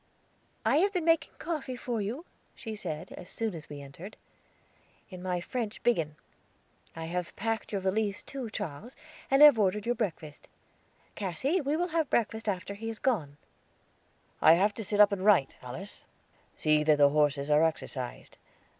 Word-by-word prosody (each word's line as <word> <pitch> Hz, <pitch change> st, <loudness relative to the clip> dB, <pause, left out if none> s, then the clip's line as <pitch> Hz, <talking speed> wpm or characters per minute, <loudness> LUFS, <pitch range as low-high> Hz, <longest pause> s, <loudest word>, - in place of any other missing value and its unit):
"I -, -, +4 dB
have 395 Hz, +5 st, +3 dB
been 355 Hz, -4 st, -1 dB
making 330 Hz, -2 st, +2 dB
coffee 305 Hz, -6 st, -4 dB
for 240 Hz, -2 st, -3 dB
you," 240 Hz, -, -4 dB, 0.3 s
she 220 Hz, -3 st, -6 dB
said, 160 Hz, -7 st, -5 dB
as 180 Hz, -, -9 dB
soon 225 Hz, -3 st, -2 dB
as 160 Hz, -3 st, -9 dB
we 145 Hz, -1 st, -7 dB
entered, 150 Hz, +9 st, -10 dB, 0.9 s
"in 185 Hz, -1 st, -8 dB
my 180 Hz, -1 st, -1 dB
French 220 Hz, +4 st, -4 dB
biggin. 165 Hz, -11 st, +1 dB, 0.8 s
I 165 Hz, 0 st, -5 dB
have 175 Hz, +1 st, -4 dB
packed 225 Hz, 0 st, -2 dB
your 200 Hz, -2 st, -1 dB
valise 200 Hz, +2 st, -1 dB
too, 265 Hz, -4 st, -6 dB
Charles, 210 Hz, -, -6 dB, 0.3 s
and 270 Hz, +2 st, +6 dB
have 290 Hz, -6 st, +9 dB
ordered 205 Hz, +1 st, +1 dB
your 240 Hz, -, +2 dB
breakfast. 165 Hz, -10 st, -5 dB, 0.7 s
Cassy, 260 Hz, -, -1 dB
we 290 Hz, +2 st, 0 dB
will 335 Hz, -2 st, +1 dB
breakfast 225 Hz, -4 st, 0 dB
after 195 Hz, 0 st, -3 dB
he 220 Hz, +3 st, -7 dB
has 225 Hz, -1 st, -4 dB
gone." 160 Hz, -, -1 dB, 1.0 s
"I 160 Hz, -, +8 dB
have 200 Hz, +5 st, +3 dB
to 220 Hz, -, -5 dB
sit 205 Hz, +1 st, -1 dB
up 210 Hz, 0 st, +8 dB
to 200 Hz, -, 0 dB
write, 185 Hz, -8 st, +4 dB
Alice. 135 Hz, +11 st, -7 dB, 0.5 s
See 155 Hz, -1 st, +3 dB
that 150 Hz, -1 st, +4 dB
the 145 Hz, -1 st, +6 dB
horses 145 Hz, -1 st, +1 dB
are 150 Hz, +2 st, +5 dB
exercised. 140 Hz, -5 st, -3 dB
205 Hz, 165 wpm, -30 LUFS, 160-240 Hz, 1.0 s, have